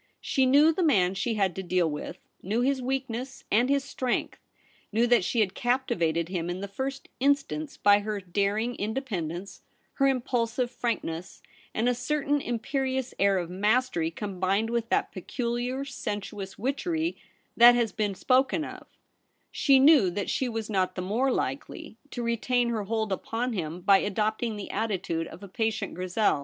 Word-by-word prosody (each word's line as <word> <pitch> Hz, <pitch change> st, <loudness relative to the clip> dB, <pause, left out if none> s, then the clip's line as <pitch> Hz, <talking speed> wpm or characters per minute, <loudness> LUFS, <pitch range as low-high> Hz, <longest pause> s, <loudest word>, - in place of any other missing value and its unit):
She 265 Hz, -1 st, +1 dB
knew 295 Hz, +5 st, +6 dB
the 365 Hz, -, -1 dB
man 195 Hz, -, +3 dB
she 220 Hz, +4 st, -1 dB
had 195 Hz, -5 st, +1 dB
to 190 Hz, -, -3 dB
deal 180 Hz, -2 st, +1 dB
with 150 Hz, -1 st, -5 dB, 0.2 s
— -, -, -39 dB
knew 215 Hz, +6 st, -1 dB
his 265 Hz, +1 st, +1 dB
weakness 260 Hz, 0 st, -3 dB
and 240 Hz, +5 st, +3 dB
his 280 Hz, -1 st, +2 dB
strength, 260 Hz, -2 st, -2 dB, 0.5 s
knew 225 Hz, +3 st, +3 dB
that 240 Hz, -4 st, +4 dB
she 230 Hz, +5 st, +1 dB
had 190 Hz, -3 st, +1 dB
captivated 170 Hz, -11 st, 0 dB
him 175 Hz, -2 st, -3 dB
in 175 Hz, +1 st, -3 dB
the 200 Hz, -, -4 dB
first 265 Hz, +7 st, -5 dB
instance 285 Hz, +2 st, 0 dB
by 205 Hz, 0 st, +5 dB
her 210 Hz, 0 st, -3 dB
daring 200 Hz, +6 st, -1 dB
independ 210 Hz, -, -2 dB
ence, 190 Hz, +3 st, -8 dB, 0.4 s
her 275 Hz, -, +5 dB
impulsive 245 Hz, -2 st, 0 dB
frankness, 180 Hz, -9 st, -4 dB, 0.3 s
and 225 Hz, +3 st, 0 dB
a 250 Hz, -, +3 dB
certain 290 Hz, +3 st, 0 dB
imperious 260 Hz, +2 st, -2 dB
air 200 Hz, 0 st, +4 dB
of 175 Hz, -1 st, -3 dB
mastery 210 Hz, -3 st, +1 dB
combined 195 Hz, +4 st, -1 dB
with 235 Hz, -1 st, -1 dB
that -, -, +1 dB
peculiar 245 Hz, +6 st, -3 dB
sensuous 205 Hz, -6 st, -5 dB
witchery 320 Hz, -, -1 dB, 0.4 s
that 240 Hz, +1 st, +8 dB
has 235 Hz, -3 st, +1 dB
been 205 Hz, -1 st, -1 dB
spoken 265 Hz, -, +2 dB
of -, -, -10 dB, 0.6 s
She 275 Hz, -2 st, +4 dB
knew 270 Hz, -, +6 dB
that 200 Hz, +3 st, -3 dB
she 260 Hz, -, 0 dB
was 225 Hz, -2 st, -3 dB
not 190 Hz, -4 st, 0 dB
the 185 Hz, -, -3 dB
more 235 Hz, +8 st, +1 dB
likely 135 Hz, -, -4 dB
to 245 Hz, -, -5 dB
retain 235 Hz, +1 st, +1 dB
her 220 Hz, -3 st, -2 dB
hold 220 Hz, 0 st, -1 dB
upon 230 Hz, +5 st, -2 dB
him 170 Hz, -3 st, -4 dB
by 195 Hz, +2 st, +6 dB
adopting 215 Hz, +3 st, -1 dB
the 205 Hz, -, -6 dB
attitude 190 Hz, -6 st, -2 dB
of 180 Hz, +5 st, -11 dB
a -, -, -7 dB
patient 220 Hz, 0 st, -2 dB
Grizel. 185 Hz, -1 st, +1 dB
225 Hz, 170 wpm, -27 LUFS, 195-255 Hz, 0.6 s, that